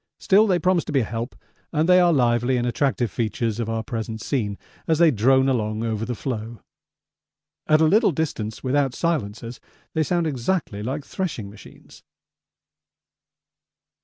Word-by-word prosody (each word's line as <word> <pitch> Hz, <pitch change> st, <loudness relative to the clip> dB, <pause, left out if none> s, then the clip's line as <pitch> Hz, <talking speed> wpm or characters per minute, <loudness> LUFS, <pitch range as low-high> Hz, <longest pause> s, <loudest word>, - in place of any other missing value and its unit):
Still 210 Hz, +3 st, +4 dB
they 185 Hz, -3 st, +3 dB
promise 175 Hz, 0 st, +2 dB
to -, -, -5 dB
be 140 Hz, -3 st, +2 dB
a -, -, -1 dB
help, 115 Hz, +4 st, -5 dB, 0.4 s
and 155 Hz, 0 st, +1 dB
they 180 Hz, 0 st, +6 dB
are 175 Hz, -1 st, +5 dB
lively 120 Hz, -2 st, +2 dB
and 120 Hz, -, -1 dB
attractive 120 Hz, -3 st, 0 dB
features 115 Hz, 0 st, -2 dB
of 115 Hz, -1 st, -2 dB
our 115 Hz, 0 st, -2 dB
present 110 Hz, -1 st, -5 dB
scene 105 Hz, -4 st, -2 dB, 0.3 s
as 160 Hz, -, +2 dB
they 165 Hz, -1 st, +5 dB
drone 130 Hz, +3 st, +3 dB
along 110 Hz, -4 st, -1 dB
over 110 Hz, -1 st, -2 dB
the 125 Hz, -, -3 dB
floe. 115 Hz, -2 st, -5 dB, 1.1 s
At 155 Hz, 0 st, +4 dB
a -, -, +6 dB
little 210 Hz, +6 st, +4 dB
distance, 125 Hz, -9 st, -3 dB
without 135 Hz, 0 st, +1 dB
silencers, 115 Hz, -8 st, -2 dB, 0.3 s
they 160 Hz, -, +1 dB
sound 170 Hz, +2 st, 0 dB
exactly 135 Hz, -, -2 dB
like 135 Hz, +6 st, -4 dB
threshing 130 Hz, -, -4 dB
machines. 105 Hz, -, -15 dB
125 Hz, 160 wpm, -23 LUFS, 115-155 Hz, 1.1 s, they